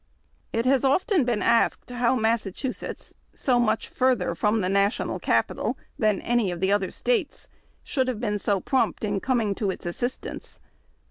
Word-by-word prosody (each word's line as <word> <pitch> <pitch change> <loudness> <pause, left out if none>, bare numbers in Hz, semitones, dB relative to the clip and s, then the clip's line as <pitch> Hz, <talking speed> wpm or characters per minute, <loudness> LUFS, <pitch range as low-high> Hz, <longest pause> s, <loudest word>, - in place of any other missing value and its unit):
It 230 +1 -1
has 265 0 +3
often 315 - +3
been 235 -4 0
asked 235 +1 +2
how 245 +1 +2
Mas 225 -1 +2
sachusetts, 235 +7 -5 0.2
so 250 -3 +2
much 220 -2 +1
farther 250 -9 +1
from 210 +5 +1
the 185 - 0
National 200 +2 +1
Capital - - 0 0.2
than 215 -3 +2
any 235 -4 +1
of 175 -1 -4
the 190 +2 +1
other 200 -2 +1
States, 435 - -1 0.4
should 260 -2 0
have 250 -4 -2
been 210 -3 -1
so 200 0 +1
prompt 260 +4 0
in 205 -2 0
coining 230 -6 +1
to 200 0 -2
its 190 - -5
assistance. 245 +9 -4
230 Hz, 165 wpm, -25 LUFS, 200-255 Hz, 0.4 s, has